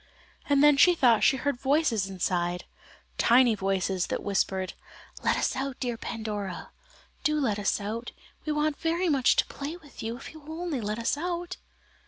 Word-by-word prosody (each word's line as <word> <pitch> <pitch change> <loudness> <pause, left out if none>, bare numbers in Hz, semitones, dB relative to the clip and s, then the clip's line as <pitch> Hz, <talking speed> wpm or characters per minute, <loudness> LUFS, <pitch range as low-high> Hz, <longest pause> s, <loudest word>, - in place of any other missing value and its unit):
And 285 0 +4
then 295 -1 +6
she 355 +5 +6
thought 240 -8 +4
she 265 - +5
heard 285 -2 -2
voices 270 -8 +2
inside, 180 -1 -1 0.6
tiny 245 0 +5
voices 190 -2 -1
that - - -3
whispered: 190 -2 -1 0.5
"Let - - +2
us - - 0
out, 270 -1 -3
dear 245 -3 -2
Pandora, 210 -5 -5 0.5
do 305 0 +2
let 215 -7 0
us 205 - 0
out; 220 +4 -4 0.3
we 305 - -2
want 300 0 0
very 335 +2 0
much 275 -4 +4
to - - +3
play 290 +5 -6
with 300 -5 -13
you 230 +2 -4
if 265 - -10
you 315 - -11
will 315 +2 -8
only 335 -8 -2
let 210 0 -2
us 230 +4 0
out?" 350 +2 -3
255 Hz, 180 wpm, -28 LUFS, 205-300 Hz, 0.6 s, then